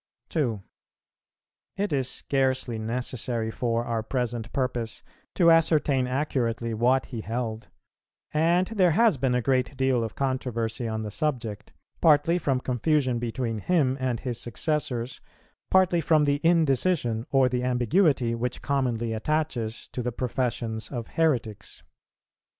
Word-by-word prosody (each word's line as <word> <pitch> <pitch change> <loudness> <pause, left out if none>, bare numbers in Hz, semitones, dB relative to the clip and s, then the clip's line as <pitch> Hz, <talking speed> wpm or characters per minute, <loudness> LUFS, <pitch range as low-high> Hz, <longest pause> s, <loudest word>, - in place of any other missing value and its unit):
2. 120 -11 -1 1.1
It 200 -4 -1
is 130 -2 0
scarcely 130 -4 -1
necessary 115 0 -3
for 115 0 -1
our 115 -1 -1
present 120 -1 -3
purpose 120 -4 -2 0.3
to 170 -3 +5
ascertain 150 -5 +3
accurately 120 -4 -1
what 125 +4 +2
he 115 -4 -6
held, 115 0 -4 0.7
and 170 +4 +3
there 185 -5 +2
has 220 -3 +4
been 130 -1 +1
a 125 - 0
great 130 +1 0
deal 130 -3 +2
of 110 - -5
controversy 125 -3 -2
on 110 0 -3
the 105 - -5
subject; 120 -6 -3 0.3
partly 160 +2 +4
from 135 -5 0
confusion 130 0 +1
between 115 -1 -2
him 140 - +2
and 125 -3 -1
his 125 -3 -3
successors, 125 -1 -3 0.5
partly 185 -2 +4
from 155 0 +3
the 145 0 +1
indecision 150 -7 +2
or 135 -2 +4
the 125 0 -1
ambiguity 125 - +2
which 120 +2 -3
commonly 120 -5 0
attaches 120 -2 -2
to 125 - -4
the 125 0 -2
professions 120 -2 -2
of 120 -4 -5
heretics. 125 -10 -1
125 Hz, 135 wpm, -26 LUFS, 115-145 Hz, 1.1 s, to